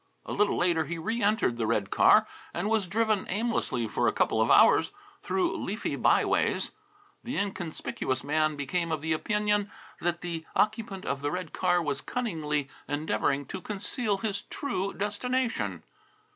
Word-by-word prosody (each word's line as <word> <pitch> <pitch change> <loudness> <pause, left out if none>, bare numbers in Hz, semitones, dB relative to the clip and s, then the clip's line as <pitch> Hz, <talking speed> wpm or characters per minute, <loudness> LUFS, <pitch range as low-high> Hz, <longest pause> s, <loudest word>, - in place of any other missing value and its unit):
A - - -4
little 210 0 +2
later 170 -3 +2
he 170 - -4
reëntered 210 - +1
the 115 -2 0
red 100 -2 0
car - - +6 0.3
and 175 +4 -1
was 215 -4 +2
driven 215 0 +1
aimlessly 195 - 0
for 110 - 0
a - - +4
couple - - +1
of - - +2
hours - - +6 0.3
through 360 -3 0
leafy - - -3
by - - +3
ways. - - +1 0.5
The 245 +3 -4
inconspicuous 180 -9 -2
man 155 +1 +1
became 165 +4 -2
of 155 -2 -1
the 160 0 +1
opinion 210 +3 +1 0.3
that 175 0 -1
the 170 -2 -4
occupant 215 -3 0
of 140 0 -2
the 145 - 0
red 180 0 -4
car 180 -2 +2
was 140 -3 -1
cunningly 155 - -2 0.2
endeavouring 145 -1 0
to 190 - -4
conceal 210 +1 -1
his 200 -1 -2
true 195 -8 -2
destination. 205 - -2
180 Hz, 160 wpm, -28 LUFS, 155-210 Hz, 0.5 s, car